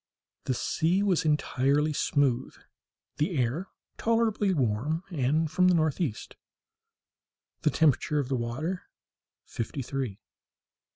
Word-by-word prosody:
The 130 - 0
sea 175 +9 +1
was 185 -5 +2
entirely 150 0 +2
smooth, 135 -3 +1 0.6
the 160 +2 0
air 130 +10 0 0.3
tolerably 225 -3 +2
warm 140 - 0
and 155 +1 +1
from 180 +3 +4
the 180 - +5
northeast, 155 - -1 1.3
the - - +3
temperature 150 0 +2
of 140 -3 0
the 135 - 0
water 130 +10 -3 0.6
fifty 125 +4 -4
three. 125 -5 -4
150 Hz, 110 wpm, -28 LUFS, 130-170 Hz, 1.3 s, the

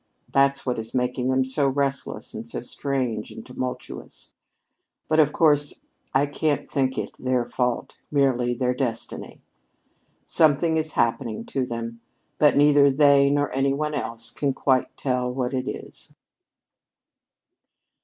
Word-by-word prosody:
That's 140 0 +2
what 125 -3 -1
is 110 +2 -5
making 125 0 0
them 130 0 +2
so 135 +2 +1
restless 140 0 -2
and - - -7
so - - -5
strange 125 -6 -2
and - - -10
tumultuous. 125 0 -6 0.7
But 155 0 +2
of 150 -2 +5
course 145 -3 +2 0.3
I 135 +2 +3
can't 145 +1 -1
think 130 -2 0
it - - -4
their 130 -1 0
fault 125 -1 -2
merely 125 -4 +2
their 125 0 0
destiny. 125 -3 -4 0.8
Something 160 +1 +3
is 155 -1 -1
happening 115 -1 0
to 130 -2 -2
them, 115 -1 -5 0.4
but 150 -1 +5
neither 145 -1 +6
they 140 0 +5
nor 145 0 +1
any 135 0 +2
one 150 +1 -2
else 115 -5 -4
can 140 -2 -1
quite 130 -2 +1
tell 125 -2 -1
what 125 0 -2
it 130 0 -2
is." - - -8
135 Hz, 140 wpm, -24 LUFS, 125-145 Hz, 0.8 s, neither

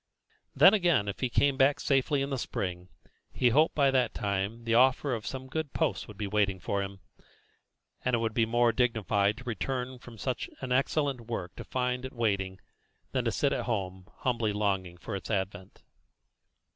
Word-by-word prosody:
Then, 195 - +8
again, 175 - +3
if 100 - -4
he 130 - 0
came 140 +2 +2
back 135 +1 +4
safely 135 +1 +1
in 140 - -4
the 135 - -1
spring, 90 -4 -4 0.4
he 125 - +3
hoped 155 +7 +3
by 140 -2 +4
that 130 -3 +1
time 100 +3 -2
the 115 0 0
offer 130 +3 +4
of 110 -3 -4
some 130 0 -5
good 145 +2 -4
post 160 -4 -1
would 105 - -11
be 105 - -3
waiting 100 -2 +1
for 100 +3 -1
him; 95 -1 -6 1.0
and 125 -1 +2
it - - +2
would 115 -1 -1
be 115 -1 +2
more 120 +1 +3
dignified 110 -4 +1
to 130 - -10
return 125 +1 -3
from 120 -1 -12
such 125 +1 -3
an 130 -2 -5
excellent 135 0 +1
work 110 -6 -5
to - - -7
find 125 0 -1
it 130 - -6
waiting, 100 -5 -1 0.5
than - - -1
to - - +2
sit - - +1
at - - -2
home 95 -4 -3
humbly 115 -4 0
longing 95 -4 -1
for 100 +3 -6
its 95 - -6
advent. 95 -2 -3
115 Hz, 190 wpm, -29 LUFS, 100-130 Hz, 1.0 s, Then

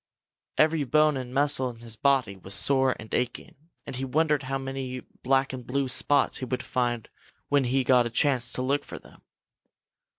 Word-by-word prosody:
Every 155 -1 +3
bone 150 +2 +3
and 130 -2 -5
muscle 140 -1 +2
in 120 - -10
his 115 -1 -6
body 130 -5 +1
was 95 +1 -1
sore 130 +2 +4
and 110 - -11
aching, 125 -1 -2 0.3
and 130 - -6
he 130 - -3
wondered 150 +2 +1
how 135 0 -3
many 135 -1 -5 0.2
black 135 +1 +1
and 130 -1 -6
blue 135 +2 -1
spots 140 +2 +2
he 130 - -4
would 125 0 -3
find 120 -3 -2 0.4
when 145 -2 +2
he 130 +2 +1
got 125 -1 +4
a - - -5
chance 125 -1 +1
to 130 - -1
look 140 +3 0
for - - -9
them. - - -17
130 Hz, 190 wpm, -26 LUFS, 125-140 Hz, 0.4 s, sore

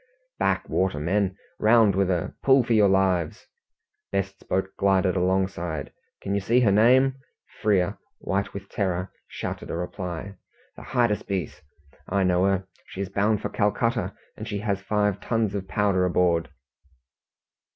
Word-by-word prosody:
"Back - - +1
water, 95 -5 0
men! 95 +4 0 0.2
Round 110 -2 +5
with 95 0 +2
her! 90 -3 -1
Pull 135 -1 +5
for 120 - 0
your 105 -3 +5
lives!" 95 -4 +1 0.7
Best's 100 0 -2
boat 95 +1 -2
glided 95 -1 +2
alongside. 90 -4 -1 0.3
"Can 100 - -2
you 100 - +1
see 120 +6 +3
her 110 -5 +4
name?" 130 +6 +4 0.4
Frere, 100 -4 +1 0.2
white 100 +1 -2
with 100 0 -8
terror, 95 -2 -2 0.2
shouted - - -6
a - - -3
reply. 90 +1 -5 0.4
"The - - -11
Hydaspes! 105 - -1 0.5
I 100 +1 +1
know 90 0 +3
her. 95 -1 0 0.2
She 95 - -6
is 100 - -3
bound 105 +2 +1
for - - -1
Calcutta, 115 +2 0 0.2
and - - -7
she 105 - -3
has 100 -2 -1
five 105 0 0
tons 115 -4 -1
of 95 -2 -4
powder 100 -2 +1
aboard!" 90 -2 +2
100 Hz, 150 wpm, -25 LUFS, 95-105 Hz, 0.7 s, Round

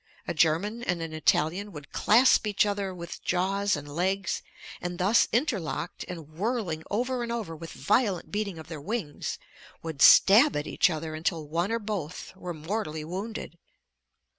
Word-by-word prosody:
A - - -1
German 170 +9 +2
and 180 -7 -1
an 165 -1 -5
Italian 160 +5 +1
would 150 -2 -10
clasp 230 0 +4
each 205 0 +3
other 200 -2 -1
with 170 -2 -8
jaws 195 +2 +1
and 145 0 -7
legs, 185 +5 -1 0.4
and 175 0 -4
thus 195 +6 +4
interlocked 195 - -1
and 165 -5 -7
whirling 180 0 -2
over 250 +4 -1
and 235 -1 -3
over 220 -9 -3
with 165 +1 -8
violent 205 -5 0
beating 205 -4 -2
of 160 - -10
their 160 -3 -7
wings 190 -4 -3 0.5
would 160 -4 -5
stab 230 +10 +8
at 145 - -1
each - - +3
other 160 -1 -4
until 155 0 -2
one 170 +6 -1
or 230 - +1
both 200 -7 -5
were 180 -1 -6
mortally 160 -1 -3
wounded. 185 0 -6
180 Hz, 165 wpm, -28 LUFS, 160-210 Hz, 0.5 s, stab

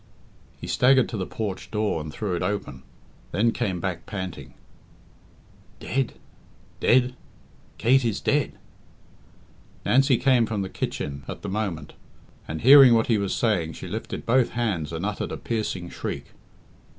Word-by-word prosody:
He - - -7
staggered 130 0 +4
to - - -5
the 95 - -3
porch 105 -4 -5
door 105 -6 -1
and 75 0 -7
threw 100 +3 -3
it - - -3
open, 100 -10 -3 0.5
then 115 +3 +2
came 100 -7 -2
back 90 -2 -4
panting 95 -4 -6 1.2
"Dead! 135 -1 -1 0.7
dead! 125 +1 +3 0.6
Kate 130 +3 +4
is 115 -4 -1
dead!" - - +1 1.3
Nancy 135 0 +4
came 125 -3 +3
from 105 -3 -2
the 95 - -5
kitchen 70 -5 -4
at - - -7
the 100 - -4
moment, 95 -7 -3 0.5
and 80 0 -5
hearing 135 -2 +9
what 115 - +3
he 105 - +2
was 100 -1 -1
saying, 90 -9 0
she - - -8
lifted 110 +6 -5
both 125 +1 +2
hands 95 -11 -1
and 85 +3 -3
uttered 105 -1 -3
a - - -4
piercing 105 -6 -3
shriek. - - -5
105 Hz, 150 wpm, -25 LUFS, 90-120 Hz, 1.3 s, hearing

